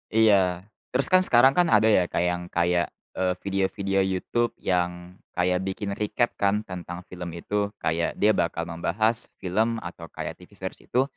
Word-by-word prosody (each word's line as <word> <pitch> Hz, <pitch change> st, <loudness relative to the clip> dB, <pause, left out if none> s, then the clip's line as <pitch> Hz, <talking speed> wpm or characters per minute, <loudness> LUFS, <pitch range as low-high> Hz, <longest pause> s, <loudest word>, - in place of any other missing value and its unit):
Iya, 95 Hz, -5 st, +4 dB, 0.3 s
terus 135 Hz, -, +2 dB
kan 185 Hz, -, +7 dB
sekarang 130 Hz, -7 st, +5 dB
kan 175 Hz, +4 st, +3 dB
ada 110 Hz, -1 st, +4 dB
ya, 90 Hz, -4 st, +4 dB
Kak, 85 Hz, -, 0 dB
yang 90 Hz, 0 st, -1 dB
kayak, 85 Hz, -1 st, +1 dB, 0.2 s
eee, 90 Hz, -1 st, 0 dB
video-video 95 Hz, 0 st, 0 dB
YouTube 95 Hz, +5 st, 0 dB
yang 90 Hz, 0 st, -2 dB, 0.2 s
kayak 90 Hz, +1 st, +2 dB
bikin 100 Hz, +1 st, -3 dB
recap 115 Hz, +3 st, 0 dB
kan 100 Hz, +1 st, +2 dB
tentang 90 Hz, -2 st, -7 dB
film 90 Hz, -1 st, -6 dB
itu 100 Hz, +4 st, -1 dB
kayak 80 Hz, +1 st, -1 dB
dia 105 Hz, +1 st, +4 dB
bakal 85 Hz, -4 st, 0 dB
membahas 95 Hz, +8 st, 0 dB
film 110 Hz, +5 st, 0 dB
atau 85 Hz, -1 st, -8 dB
kayak -, -, -6 dB
TV -, -, -16 dB
series -, -, -6 dB
itu 125 Hz, -, +2 dB
95 Hz, 165 wpm, -26 LUFS, 90-105 Hz, 0.3 s, kan